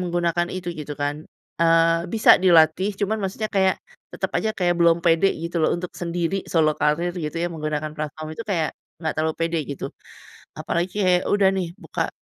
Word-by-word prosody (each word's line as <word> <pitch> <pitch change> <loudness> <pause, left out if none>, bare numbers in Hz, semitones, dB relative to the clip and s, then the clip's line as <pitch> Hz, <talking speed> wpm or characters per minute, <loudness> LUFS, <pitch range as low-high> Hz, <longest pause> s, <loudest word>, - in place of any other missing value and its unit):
menggunakan 175 -1 0
itu 185 -1 -5
gitu 150 -2 -6
kan. 145 +1 -2 0.4
Eee, 165 +1 +3
bisa 225 0 +7
dilatih, 170 +2 +5
cuman 215 +2 0
maksudnya 195 +3 -2
kayak 190 -2 +2 0.3
tetap - - -3
aja 220 - 0
kayak 175 -2 +1
belum 170 0 +5
pede 170 +3 +4
gitu 170 +2 -5
loh, - - +3
untuk 175 0 -6
sendiri, 175 +2 -2
solo 155 -2 +3
karir 170 +4 +1
gitu 155 -2 -4
ya, 170 - 0
menggunakan 155 -1 -3
platform 155 +1 -5
itu 230 - -6
kayak 165 -8 0 0.3
enggak 160 -2 -1
terlalu 160 0 0
pede 165 0 0
gitu. 140 - -4 0.7
Apalagi 175 +2 -2
kayak 180 -1 +3
udah 200 -1 +4
nih, 190 -3 -2
buka, - - -3
170 Hz, 175 wpm, -23 LUFS, 155-185 Hz, 0.7 s, bisa